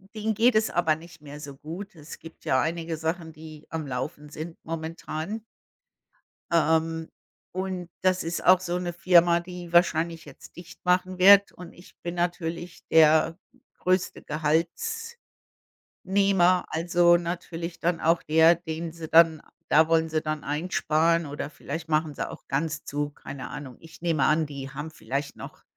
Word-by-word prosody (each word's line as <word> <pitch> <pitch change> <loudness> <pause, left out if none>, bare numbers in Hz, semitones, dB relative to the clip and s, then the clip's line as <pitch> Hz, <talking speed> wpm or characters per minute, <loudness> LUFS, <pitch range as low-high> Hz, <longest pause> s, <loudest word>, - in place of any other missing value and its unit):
denen 215 +1 -1
geht 230 +2 +3
es 215 0 +2
aber 165 -3 +2
nicht 165 0 -14
mehr 145 0 -10
so 140 -2 -9
gut. 180 +7 -8
Es 155 0 -10
gibt 165 0 -14
ja 130 - +3
einige 165 +1 -2
Sachen, 160 0 -3
die 155 -1 -12
am 160 -2 -4
Laufen 145 +4 -5
sind 160 +2 -7
momentan. 165 +5 -5 1.1
Ähm, 160 0 +1 0.5
und 185 -2 -4
das 185 -1 +2
ist 170 +1 -3
auch 185 0 +6
so 180 -1 -2
'ne 175 -1 -3
Firma, 170 0 +4
die 175 -1 -9
wahrscheinlich 165 -1 +2
jetzt - - -14
dicht 175 +1 -13
machen 185 +1 +1
wird. 200 +2 +7
Und 175 -1 -11
ich 175 - -17
bin 175 0 -4
natürlich 175 0 -3
der 160 +2 +5 0.4
größte 185 0 0
Gehaltsnehmer, 170 - -2 1.3
also 175 +1 +4
natürlich 170 0 -5
dann 170 0 0
auch 165 +1 +2
der, 160 +2 +5
den 165 -1 -5
sie 165 -1 -8
dann 165 -1 +5 0.3
da 160 +1 +6
wollen 160 0 +2
sie 155 0 0
dann 155 -1 -3
einsparen 160 +1 +1
oder 145 +1 -5
vielleicht 160 +4 -7
machen 155 -1 0
sie - - -3
auch - - -11
ganz 150 +2 -2
zu, 145 0 -3
keine 135 -2 -8
Ahnung. 130 -5 -8
Ich 165 0 -15
nehme 165 -5 +1
an, 155 0 +2
die 140 -2 -7
haben 150 +2 -6
vielleicht 140 +1 -4
noch - - -11
165 Hz, 160 wpm, -26 LUFS, 155-175 Hz, 1.3 s, wird